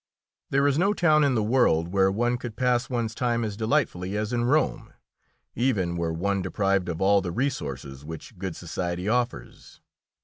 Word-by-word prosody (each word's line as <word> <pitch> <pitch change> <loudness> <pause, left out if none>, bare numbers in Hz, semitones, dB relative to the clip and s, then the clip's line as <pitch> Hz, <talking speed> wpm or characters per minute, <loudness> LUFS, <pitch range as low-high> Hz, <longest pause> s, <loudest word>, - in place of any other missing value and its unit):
There 140 +1 +2
is 140 +2 +2
no 200 +3 +3
town 155 -4 +4
in 140 -3 +2
the 110 - +1
world 105 -8 +2
where 95 +1 +3
one 120 +4 0
could 120 -3 -7
pass 125 +1 +1
one's 120 -3 -2
time 120 -1 0
as 105 -2 -3
delightfully 105 -5 0
as 105 +2 -2
in 120 0 +1
Rome, 150 +5 0 0.6
even 105 -9 0
were 85 -1 -1
one 100 +4 -1
deprived 95 0 0
of 85 -1 -4
all 100 +1 +4
the 90 -2 -4
resources 70 - -3
which 80 +5 -9
good 95 -3 -4
society 90 +1 -4
offers. 120 - -3
105 Hz, 175 wpm, -26 LUFS, 90-125 Hz, 0.6 s, town